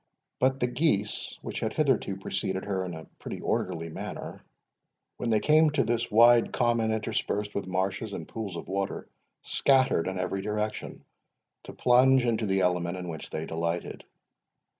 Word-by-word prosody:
But 130 Hz, +1 st, +2 dB
the -, -, +2 dB
geese, 120 Hz, -5 st, 0 dB
which -, -, -4 dB
had 110 Hz, -, -2 dB
hitherto 135 Hz, -10 st, +1 dB
preceded 95 Hz, 0 st, -3 dB
her 95 Hz, -2 st, -1 dB
in 90 Hz, -2 st, -5 dB
a 80 Hz, -, -9 dB
pretty -, -, -6 dB
orderly 80 Hz, 0 st, -2 dB
manner, 80 Hz, -, -7 dB, 0.8 s
when 120 Hz, -, -2 dB
they 110 Hz, -1 st, +3 dB
came 155 Hz, +4 st, +5 dB
to 145 Hz, -, +3 dB
this 120 Hz, 0 st, -1 dB
wide 120 Hz, +2 st, +6 dB
common, 120 Hz, -2 st, +1 dB
interspersed 105 Hz, -2 st, -2 dB
with 100 Hz, -, -3 dB
marshes 95 Hz, +3 st, -2 dB
and -, -, -6 dB
pools 105 Hz, -5 st, -5 dB
of -, -, -7 dB
water, 100 Hz, 0 st, -3 dB, 0.4 s
scattered 130 Hz, -11 st, +3 dB
in 95 Hz, 0 st, -3 dB
every 90 Hz, +1 st, -2 dB
direction, 105 Hz, +1 st, -4 dB, 0.6 s
to -, -, -9 dB
plunge 130 Hz, +1 st, +4 dB
into 115 Hz, -2 st, 0 dB
the 95 Hz, 0 st, +2 dB
element 90 Hz, 0 st, 0 dB
in 90 Hz, -1 st, -6 dB
which 80 Hz, -2 st, -7 dB
they 80 Hz, 0 st, -4 dB
delighted. 85 Hz, +1 st, -3 dB
105 Hz, 160 wpm, -28 LUFS, 95-120 Hz, 0.8 s, wide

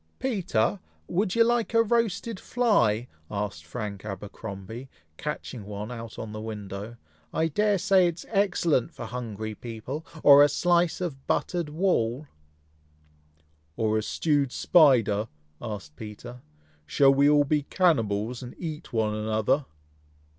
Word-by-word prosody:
"Peter! 165 Hz, -, 0 dB, 0.3 s
would 195 Hz, +2 st, 0 dB
you 230 Hz, -, +6 dB
like 235 Hz, -1 st, +1 dB
a 230 Hz, -, +6 dB
roasted 230 Hz, -2 st, 0 dB
fly?" 125 Hz, -, +2 dB, 0.2 s
asked 100 Hz, -6 st, -4 dB
Frank 100 Hz, +1 st, -5 dB
Abercromby, 105 Hz, +3 st, -7 dB, 0.3 s
catching 130 Hz, -6 st, -5 dB
one 105 Hz, +3 st, -6 dB
on 115 Hz, -2 st, -7 dB
the 110 Hz, 0 st, -6 dB
window. 105 Hz, 0 st, -6 dB, 0.3 s
"I 165 Hz, 0 st, 0 dB
dare 210 Hz, +5 st, +2 dB
say 190 Hz, -1 st, +4 dB
it 170 Hz, -, -2 dB
is 170 Hz, -, -10 dB
excellent 175 Hz, -, +1 dB
for -, -, -6 dB
hungry 110 Hz, -2 st, -5 dB
people, 120 Hz, +7 st, -6 dB, 0.2 s
or 140 Hz, 0 st, +9 dB
a 145 Hz, -, +7 dB
slice 175 Hz, +4 st, +2 dB
of 140 Hz, -7 st, -5 dB
buttered 175 Hz, -4 st, -1 dB
wall?" 150 Hz, -6 st, 0 dB, 1.5 s
"Or 110 Hz, -1 st, +1 dB
a 110 Hz, -, +2 dB
stewed 145 Hz, +3 st, 0 dB
spider?" 120 Hz, -, +4 dB, 0.3 s
asked 100 Hz, -9 st, -7 dB
Peter. 110 Hz, +5 st, -9 dB, 0.5 s
"Shall 135 Hz, -, +5 dB
we 140 Hz, +1 st, +4 dB
all 145 Hz, -1 st, +5 dB
be 150 Hz, +1 st, +1 dB
cannibals, 120 Hz, -, +1 dB
and 125 Hz, -1 st, -9 dB
eat 160 Hz, -3 st, -6 dB
one 110 Hz, -2 st, 0 dB
another?" 110 Hz, +6 st, 0 dB
125 Hz, 130 wpm, -27 LUFS, 110-170 Hz, 1.5 s, or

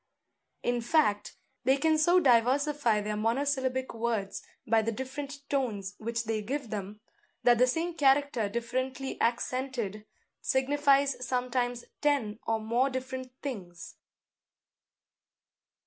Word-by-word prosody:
In 245 Hz, 0 st, 0 dB
fact, 235 Hz, -6 st, +1 dB, 0.3 s
they 265 Hz, +2 st, +4 dB
can 315 Hz, +2 st, +2 dB
so 345 Hz, +4 st, +5 dB
diversify 255 Hz, -2 st, +3 dB
their 210 Hz, +1 st, -2 dB
monosyllabic 260 Hz, +3 st, 0 dB
words 225 Hz, -4 st, -2 dB, 0.2 s
by 225 Hz, -2 st, +3 dB
the 225 Hz, +1 st, -1 dB
different 275 Hz, +3 st, -6 dB
tones 220 Hz, -9 st, -1 dB
which 230 Hz, +1 st, -2 dB
they 220 Hz, -1 st, -1 dB
give 255 Hz, +2 st, -4 dB
them, 205 Hz, 0 st, -5 dB, 0.4 s
that 240 Hz, -1 st, +5 dB
the 250 Hz, -, +6 dB
same 330 Hz, +7 st, -1 dB
character 275 Hz, -7 st, +2 dB
differently 255 Hz, +4 st, -3 dB
accented 235 Hz, -3 st, -1 dB, 0.3 s
signifies 275 Hz, 0 st, +2 dB
sometimes 245 Hz, -1 st, -1 dB, 0.2 s
ten 255 Hz, -8 st, +1 dB
or 225 Hz, -1 st, +1 dB
more 235 Hz, +5 st, +1 dB
different 260 Hz, 0 st, -5 dB
things. 180 Hz, -11 st, -7 dB
250 Hz, 115 wpm, -29 LUFS, 225-275 Hz, 0.4 s, the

